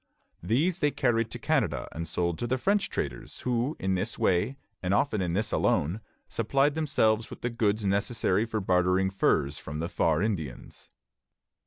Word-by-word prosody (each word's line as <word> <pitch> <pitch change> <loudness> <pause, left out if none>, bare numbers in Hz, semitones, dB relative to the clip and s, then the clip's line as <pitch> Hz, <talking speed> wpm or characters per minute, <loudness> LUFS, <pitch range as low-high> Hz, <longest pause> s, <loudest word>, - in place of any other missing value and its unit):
These 150 - +1
they 150 - +3
carried 115 -5 +1
to - - -5
Canada - - 0
and 85 +1 -5
sold 85 +1 -1
to 120 - -2
the 130 +2 +1
French 200 +8 +1
traders, - - -4
who 125 +4 -1
in 95 0 0
this 90 - -2
way, 100 +9 +1 0.2
and 95 +2 +1
often 110 -3 +1
in 85 -2 -1
this 110 +3 -1
alone, 90 +9 +1 0.3
supplied 135 +6 +1
themselves 115 -8 +1
with - - -10
the 120 - -1
goods 110 -3 0
necessary 100 +1 +1
for 110 -1 -2
bartering 90 0 +2
furs 75 -6 +1
from 75 +2 -6
the 80 +2 -2
"Far 80 -1 +1
Indians." 80 - -4
105 Hz, 170 wpm, -28 LUFS, 90-120 Hz, 0.3 s, they